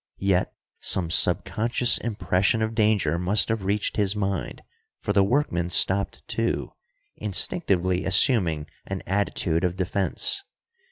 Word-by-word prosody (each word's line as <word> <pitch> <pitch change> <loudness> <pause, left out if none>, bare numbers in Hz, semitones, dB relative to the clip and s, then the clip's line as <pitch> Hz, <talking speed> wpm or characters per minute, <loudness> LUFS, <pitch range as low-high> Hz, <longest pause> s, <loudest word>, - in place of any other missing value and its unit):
Yet 95 -2 0 0.3
some 85 -3 +1
subconscious 120 +7 +3
impression 100 0 -1
of 110 0 -3
danger 105 -7 +1
must 95 +5 +1
have 115 -4 -2
reached 100 +2 -2
his 100 -1 +1
mind, 100 -4 -4 0.3
for 100 - -3
the 100 0 +3
workman 95 - -1
stopped 100 +2 +1
too, - - -2 0.5
instinctively 95 - 0
assuming 90 - +3 0.2
an 95 -1 -5
attitude 95 -3 -1
of 90 -1 -1
defense. 95 - -1
95 Hz, 120 wpm, -24 LUFS, 90-105 Hz, 0.5 s, subconscious